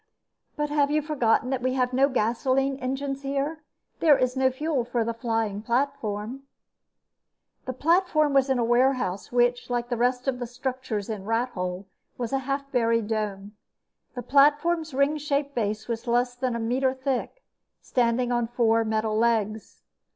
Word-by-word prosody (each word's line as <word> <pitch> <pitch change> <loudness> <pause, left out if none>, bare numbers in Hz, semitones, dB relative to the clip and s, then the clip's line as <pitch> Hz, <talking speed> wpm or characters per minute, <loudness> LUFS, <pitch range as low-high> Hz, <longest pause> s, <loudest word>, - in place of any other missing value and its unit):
But 295 0 -2
have 290 -1 +2
you 300 0 +1
forgotten 255 -4 +1
that 260 -2 -1
we 255 +1 0
have 250 -1 0
no 270 +2 +4
gasoline 260 +3 +1
engines 270 +1 -3
here? 280 +3 -2 0.4
There 300 -4 +5
is 255 0 0
no 260 0 +3
fuel 275 0 -1
for 240 -1 -1
the 230 +1 -2
flying 225 -3 -2
platform." 235 -1 -2 1.2
The 255 - -3
platform 310 0 +2
was 275 0 +3
in 265 - +2
a 240 - +1
warehouse 240 -5 +1
which, 245 0 +1
like 240 0 -2
the 240 - -1
rest 250 +2 0
of 255 -2 0
the 245 - -4
structures 245 -4 -4
in 210 -3 -5
Rathole, 200 -5 -2 0.3
was 245 +1 -4
a 270 - +2
half 275 0 -2
buried 230 -3 +1
dome. 205 -2 -3 0.6
The 245 - -5
platform's 300 +5 +3
ring 280 +3 +2
shaped 285 -1 -1
base 215 -2 -2
was 235 +1 -4
less 245 +1 +1
than 245 -1 -2
a - - -2
meter 260 +3 0
thick, 265 - -3 0.4
standing 245 0 0
on 240 -1 +1
four 230 -1 +2
metal 220 0 -1
legs. 220 -2 0
250 Hz, 165 wpm, -26 LUFS, 230-275 Hz, 1.2 s, There